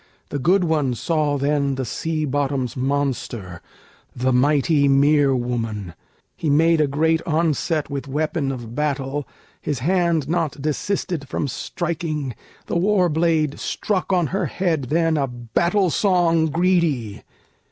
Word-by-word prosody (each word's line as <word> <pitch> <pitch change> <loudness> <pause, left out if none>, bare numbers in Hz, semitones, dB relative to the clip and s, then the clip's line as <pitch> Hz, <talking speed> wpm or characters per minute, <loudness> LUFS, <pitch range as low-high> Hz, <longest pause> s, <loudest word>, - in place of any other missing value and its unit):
The 145 - -3
good 180 +7 +3
one 150 -7 +1
saw 150 +1 0
then 140 0 0
the 130 0 -3
sea 155 +6 -2
bottom's 135 -3 -1
monster, 130 - -2 0.5
The 130 +1 +1
mighty 140 +2 +3
mere 140 0 +4
woman: 115 -7 -3 0.4
he 155 - -2
made 160 +2 +4
a 150 - +3
great 160 +3 +1
onset 160 -1 0
With 140 0 -4
weapon 150 0 -1
of 120 -3 -7
battle; 145 0 -2 0.3
his 145 - -2
hand 170 +1 +1
not 165 -3 -1
desisted 155 0 -2
From 145 - -2
striking; 155 -2 -3 0.3
the - - -1
war 185 0 +3
blade 160 -2 +1
struck 195 -2 -2
on 180 -3 +3
her 195 - 0
head 165 -7 -1
then 165 +3 +1
A 140 -2 +1
battle 165 - 0
song 170 -5 +2
greedy. 160 - +1
150 Hz, 135 wpm, -22 LUFS, 135-165 Hz, 0.5 s, mere